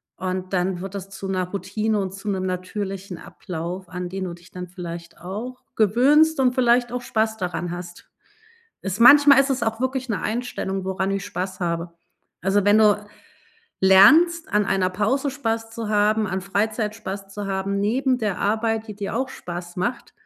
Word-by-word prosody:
und 185 0 -4
dann 180 0 0
wird 195 +2 -7
das 195 0 -6
zu 195 0 -7
'ner 185 -1 -1
Routine 205 +3 -1
und 190 -1 -3
zu 195 +2 -6
'nem 190 -2 -1
natürlichen 190 0 -4
Ablauf, 180 +1 -7
an 180 -1 -4
den 190 +1 -5
du 175 -2 -4
dich 175 +1 -15
dann 180 -1 -7
vielleicht 170 -2 -8
auch 215 +8 -7
gewöhnst 275 +9 +4
und 255 -1 +3
vielleicht 245 -1 +3
auch 250 - -2
Spaß 220 -2 0
daran 180 -2 -3
hast. 175 0 -8 0.7
Ist 190 +3 -4
manchmal 280 +3 +8
ist 275 - +1
es 260 -2 -1
auch 225 0 -1
wirklich 260 -1 -2
'ne 205 - -1
Einstellung, 215 -5 -3
woran 190 +1 -1
ich 195 0 -2
Spaß 185 +1 -5
habe. 170 0 -2 0.5
Also, 195 +2 +2
wenn 205 +1 +6
du 210 -1 +4 0.8
lernst, 305 - +6
an 210 0 +2
einer 190 -1 +1
Pause 220 +9 0
Spaß 225 -5 -2
zu 225 -2 -5
haben, 215 +1 +2
an 190 +1 -2
Freizeit 210 +2 -1
Spaß 195 -2 -6
zu 205 -1 -5
haben 195 +1 -1
neben 255 +5 +1
der 210 -6 -2
Arbeit, 220 +1 0
die 210 - -7
dir 205 +1 -4
auch 260 +1 -1
Spaß 175 -5 -7
macht 235 +7 -3
200 Hz, 180 wpm, -23 LUFS, 185-225 Hz, 0.8 s, manchmal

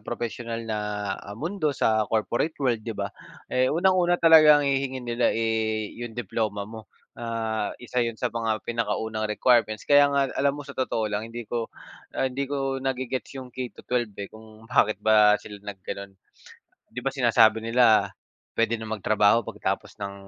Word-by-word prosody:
propesyonal 115 +1 -5
na, 110 -1 -2 0.4
ah, 100 +1 -9
mundo, 165 - -2
sa 110 -1 +2
corporate 120 +8 0
world, 125 -5 0
'di 110 -1 -6
ba? - - -3 0.4
Eh, 130 0 +3
unang-una 175 +1 +3
talagang 155 -3 +7
hihingiin 135 -2 -1
nila, 120 0 +1
eh, 110 -1 -1
'yong 120 -2 -7
diploma 105 -2 -2
mo. 110 +1 -11 0.2
Ah, 115 -2 -3
isa 125 0 -3
'yon 115 -1 -1
sa 125 +1 -2
mga 115 -3 -2
pinakaunang 110 -2 -2
requirements. 110 -1 +2
Kaya 145 0 +6
nga 140 -2 +1
alam 140 +1 +1
mo, 145 - -7
sa 140 - -9
totoo 110 -5 -2
lang, 110 +2 -2
hindi 120 +1 -7
ko 115 +1 -3 0.5
ah, - - +1
hindi 130 +1 -2
ko 135 -1 -2
nage-gets 130 0 -3
'yong 130 -2 -8
K-12, 125 -3 -3
eh, 100 -1 -6
kung 110 0 -15
bakit 110 -3 +2
ba 105 -1 +6
sila 105 -1 -11
naggano'n. 100 0 -8 0.7
'Di - - -8
ba 135 - 0
sinasabi 115 -3 +4
nila, 115 -1 +4 0.5
puwede 115 0 +2
nang 110 -1 -6
magtrabaho 105 +2 +3
pagkatapos - - -3
ng 100 -1 -5
115 Hz, 165 wpm, -25 LUFS, 110-130 Hz, 0.7 s, talagang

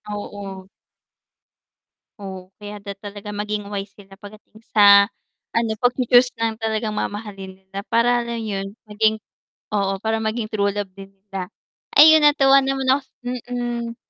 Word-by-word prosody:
oo. 195 -2 -8 1.5
Oo, 190 -2 -8
kaya 205 0 -9
dapat 200 -1 -8
talaga 205 0 -8
maging 210 0 -3
wise 200 -1 -5
sila 195 -1 -16
pagdating 215 +2 -15
sa 200 -1 +8 0.5
ano, 230 -1 +1
pagchu-choose 245 0 +4
ng 225 -1 0
talagang 220 -1 -2
mamahalin 195 -3 -5
nila 195 +1 -8
para 240 +1 +3
lang 235 0 -4
'yun 195 -2 -4 0.2
maging 215 +1 +1 0.6
oo, 195 -1 0
para 220 +2 -1
maging 220 0 -2
true 200 -1 +1
love 205 0 -3
din 195 0 -11
nila. 195 -2 -8 0.4
Ay 310 +2 +9
yun, 310 - +4
natuwa 275 -2 +6
naman 270 0 -1
ako 275 +1 +2 0.5
mm. 240 -1 -3
210 Hz, 140 wpm, -21 LUFS, 200-230 Hz, 1.5 s, Ay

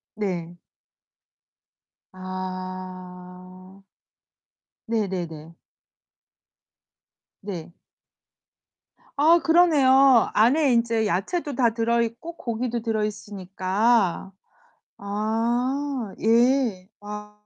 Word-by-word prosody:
네. 175 -5 -4 1.6
아. 185 0 -8 1.0
네네네. 175 -8 -3 1.9
네. 175 -4 -7 1.4
아 325 +4 +6
그러네요. 275 -7 +5
안에 260 +4 +3
인제 230 -1 +1
야채도 280 - -2
다 240 -3 +3
들어 235 0 +1
있고 235 +9 -5
고기도 235 -2 -3
들어 220 -2 -1
있으니까. 195 0 -1 0.7
아 230 +4 -2
예. 230 -4 +2
아 210 0 -8
215 Hz, 120 characters per minute, -24 LUFS, 185-245 Hz, 1.9 s, 아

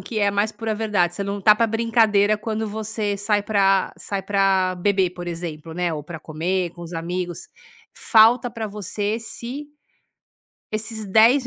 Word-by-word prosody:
que 220 - -5
é 200 -1 +3
mais 205 +2 +1
pura 225 -1 -3
verdade 205 -6 0
"Você 200 - -3
não 200 +1 -3
tá 210 +2 +6
pra 230 +2 +2
brincadeira", 220 -2 +3
quando 220 0 -3
você 215 -1 -3
sai 205 0 +1
pra 195 -2 +2
sai 200 -1 -4
pra 195 -1 +2
beber, 190 0 +1
por 175 0 -8
exemplo, 165 -2 -6
né, 175 -1 -1
ou 150 - -4
pra 160 +2 -8
comer 170 +4 -2
com 175 +1 -14
os 170 +1 -9
amigos, 175 +1 -4 0.4
falta 230 +2 +4
pra 225 -1 -4
você 205 0 -6
esse 240 +5 -7 1.1
esses 215 0 -4
10 230 +6 +5
205 Hz, 170 wpm, -22 LUFS, 180-220 Hz, 1.1 s, tá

